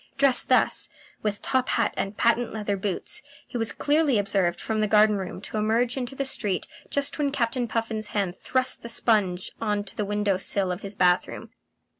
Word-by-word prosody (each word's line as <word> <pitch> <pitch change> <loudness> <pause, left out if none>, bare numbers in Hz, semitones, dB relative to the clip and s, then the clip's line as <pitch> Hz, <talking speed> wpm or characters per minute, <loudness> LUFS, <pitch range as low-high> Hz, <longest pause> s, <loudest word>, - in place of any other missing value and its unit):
Dressed 275 -2 +3
thus, - - +3 0.3
with 210 -1 -2
top 260 -1 +1
hat 230 - +1
and 195 +1 -3
patent 235 +1 +2
leather 210 -2 -2
boots, 195 -1 -3 0.2
he - - -14
was 225 -2 0
clearly 295 -4 +2
observed 195 -4 +1
from 220 -1 -1
the 215 - +2
garden 210 0 +5
room 185 -1 -5
to 210 - -5
emerge 230 +3 +1
into 260 0 -4
the 275 - -2
street 205 -8 0 0.2
just 280 +2 -1
when 285 -2 +1
Captain 245 -2 0
Puffin's 225 -1 -2
hand 195 -4 -1
thrust 255 0 +1
the 235 - -7
sponge 195 -7 +1
on 210 -2 0
to 200 - -10
the 210 - -1
window 205 -1 0
sill 190 0 0
of 180 +2 -4
his 200 0 -7
bath 180 -2 +3
room. - - -9
215 Hz, 195 wpm, -26 LUFS, 200-245 Hz, 0.3 s, garden